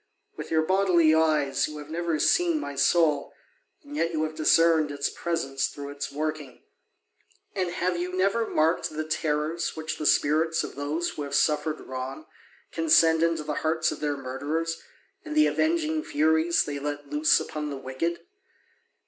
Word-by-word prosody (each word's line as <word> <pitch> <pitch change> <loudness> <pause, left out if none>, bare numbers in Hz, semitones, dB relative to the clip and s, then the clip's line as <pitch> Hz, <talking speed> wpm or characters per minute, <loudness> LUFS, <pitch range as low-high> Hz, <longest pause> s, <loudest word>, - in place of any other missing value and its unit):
With - - -7
your 160 -1 +2
bodily 180 -3 +3
eyes 155 -4 +2
you 150 - -8
have 150 +1 -9
never 170 -1 -1
seen 340 - +2
my 140 - -5
soul, 150 +2 +2 0.5
and 290 0 -10
yet 170 - 0
you 155 -1 -1
have 155 0 -3
discerned 160 0 +3
its 145 0 -2
presence 150 -6 -2
through 140 -1 -8
its 145 0 -5
working. 150 -3 -5 0.9
And 185 -2 -1
have 175 0 -1
you 180 +1 -3
never 195 +5 +1
marked 160 +3 +1
the 155 0 -4
terrors 155 +1 -1
which 160 0 -5
the 150 - 0
spirits 160 +3 +2
of - - -6
those 150 +5 -2
who - - -7
have 140 -1 -3
suffered 150 0 +1
wrong 130 +3 -6 0.5
can 165 -1 -3
send 160 0 +5
into 165 -2 +1
the 150 - -3
hearts 160 0 +1
of - - -6
their 145 -1 -2
murderers, 145 +5 -3 0.4
and 305 -2 -6
the 305 - +6
avenging 315 -1 0
furies 160 - +2
they 145 -1 -4
let 145 0 -5
loose 150 +1 +4
upon 150 -1 -5
the 140 - -5
wicked? 135 +6 -3
155 Hz, 170 wpm, -26 LUFS, 145-170 Hz, 0.9 s, the